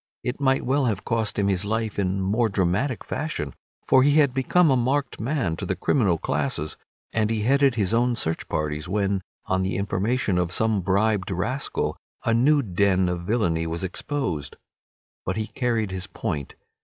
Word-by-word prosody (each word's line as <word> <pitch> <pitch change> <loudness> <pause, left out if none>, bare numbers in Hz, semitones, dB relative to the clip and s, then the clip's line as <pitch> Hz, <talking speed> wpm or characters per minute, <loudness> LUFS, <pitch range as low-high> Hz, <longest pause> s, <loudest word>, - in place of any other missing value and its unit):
It 125 +3 -3
might 135 -1 +2
well 135 +2 +2
have 105 -5 -1
cost 115 -2 -1
him 100 -1 +2
his 95 -1 +1
life 110 0 -2
in 95 0 0
more 110 +4 +1
dramatic 100 +6 0
fashion, 130 - -3 0.3
for 130 - +6
he 145 +2 +4
had 145 -5 +4
become 150 +5 +3
a - - +4
marked 135 +3 0
man 115 - -1
to - - -4
the - - 0
criminal 100 -11 +2
classes, 75 -1 -2 0.4
and 110 -1 +1
he 110 -2 0
headed 135 +1 +4
his 105 -2 0
own 120 +1 +2
search 80 -7 -2
parties 75 +1 -2
when, 100 -1 0 0.2
on 95 0 0
the 95 +1 -1
information 100 0 0
of 90 -1 0
some 110 0 +1
bribed 100 +1 +1
rascal, 105 +9 -1 0.3
a 115 - +3
new 140 +5 +4
den 95 -2 +2
of 85 0 -4
villainy 85 -8 +1
was 85 +2 -4
exposed. 90 - -3 0.7
But 95 +3 -2
he 110 - -1
carried 110 -1 -1
his 95 -1 -4
point. 75 -11 -4
105 Hz, 180 wpm, -25 LUFS, 95-125 Hz, 0.7 s, for